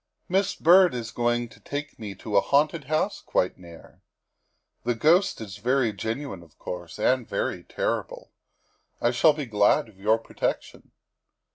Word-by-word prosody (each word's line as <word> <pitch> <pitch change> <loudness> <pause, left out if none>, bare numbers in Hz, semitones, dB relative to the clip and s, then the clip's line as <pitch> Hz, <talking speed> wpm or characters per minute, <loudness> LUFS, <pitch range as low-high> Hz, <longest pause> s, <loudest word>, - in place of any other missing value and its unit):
" - - -50
Miss 195 0 +2
Byrd 180 -2 +6
is 115 -1 -5
going 120 +1 0
to - - -17
take 145 -1 -6
me 105 -3 -6
into 105 +3 -6
a - - +6
haunted 150 +1 +1
house 155 +8 -1
quite 90 - -1
near. 85 -2 -14 0.8
The 120 0 0
ghost 170 - +3
is 100 -3 -8
very 120 +1 +1
genuine, 110 +2 -4
of 80 -3 -19
course, 90 0 -7
and 125 +2 +1
very - - -2
terrible. - - -3 0.7
I 120 - +2
shall 125 +6 +5
be 150 -1 -4
glad 105 0 +2
of 95 -3 -21
your 110 +3 +3
protection." 115 - -4
120 Hz, 160 wpm, -26 LUFS, 105-145 Hz, 0.8 s, Byrd